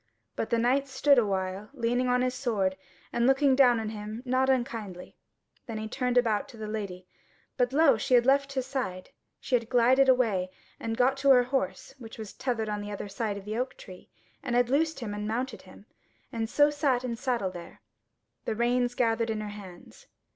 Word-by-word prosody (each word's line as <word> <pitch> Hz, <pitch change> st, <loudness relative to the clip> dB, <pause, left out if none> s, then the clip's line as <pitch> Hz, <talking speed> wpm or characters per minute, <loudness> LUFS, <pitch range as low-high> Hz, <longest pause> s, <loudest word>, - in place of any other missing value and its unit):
But -, -, -3 dB
the 235 Hz, -, +2 dB
Knight 260 Hz, +4 st, +2 dB
stood 270 Hz, +1 st, +4 dB
a 230 Hz, -, +2 dB
while 190 Hz, +1 st, -3 dB
leaning 245 Hz, 0 st, 0 dB
on 250 Hz, 0 st, +2 dB
his 255 Hz, 0 st, 0 dB
sword, 220 Hz, -8 st, -1 dB, 0.4 s
and 235 Hz, +1 st, +2 dB
looking 270 Hz, 0 st, +4 dB
down 250 Hz, -3 st, +5 dB
on 220 Hz, -1 st, -3 dB
him 215 Hz, +2 st, -7 dB
not 260 Hz, +1 st, +1 dB
unkindly. 230 Hz, -8 st, -2 dB, 0.5 s
Then 225 Hz, -2 st, -5 dB
he 215 Hz, 0 st, -4 dB
turned 250 Hz, +1 st, -1 dB
about 225 Hz, -1 st, +2 dB
to 240 Hz, -, -13 dB
the 215 Hz, -, -6 dB
Lady, 200 Hz, -4 st, -5 dB, 0.5 s
but 245 Hz, -1 st, +1 dB
lo! 280 Hz, -3 st, +4 dB
she 250 Hz, +4 st, +2 dB
had 240 Hz, -1 st, +4 dB
left 275 Hz, +1 st, +2 dB
his 260 Hz, -2 st, -2 dB
side. 250 Hz, -9 st, -4 dB, 0.3 s
She -, -, -7 dB
had 235 Hz, -2 st, +2 dB
glided 260 Hz, +2 st, +4 dB
away, 220 Hz, -8 st, +2 dB, 0.3 s
and 225 Hz, 0 st, -3 dB
got 260 Hz, +2 st, +3 dB
to 275 Hz, +1 st, +1 dB
her 250 Hz, -2 st, +7 dB
horse, 265 Hz, +1 st, -3 dB
which 225 Hz, -2 st, -10 dB
was 215 Hz, -3 st, -8 dB
tethered 235 Hz, -4 st, -2 dB
on 210 Hz, -1 st, -3 dB
the 205 Hz, -, -6 dB
other 205 Hz, 0 st, -6 dB
side 205 Hz, 0 st, -3 dB
of 200 Hz, -, -10 dB
the 215 Hz, +1 st, -4 dB
oak 255 Hz, +1 st, -3 dB
tree, 185 Hz, -1 st, -13 dB, 0.3 s
and 240 Hz, -, -2 dB
had 245 Hz, 0 st, +2 dB
loosed 315 Hz, +1 st, +1 dB
him 210 Hz, -3 st, -4 dB
and 210 Hz, 0 st, -4 dB
mounted 230 Hz, -1 st, -3 dB
him, 190 Hz, +2 st, -16 dB, 0.5 s
and 225 Hz, -1 st, -3 dB
so 290 Hz, +2 st, +4 dB
sat 280 Hz, -4 st, 0 dB
in 250 Hz, -, -3 dB
the 230 Hz, -, -4 dB
saddle 240 Hz, -7 st, -1 dB
there, 175 Hz, -2 st, -11 dB, 0.6 s
the 220 Hz, -, -2 dB
reins 245 Hz, +1 st, +1 dB
gathered 230 Hz, -1 st, +1 dB
in 220 Hz, -1 st, -2 dB
her 210 Hz, -1 st, -5 dB
hands. 205 Hz, -, -12 dB
240 Hz, 210 wpm, -28 LUFS, 215-260 Hz, 0.6 s, her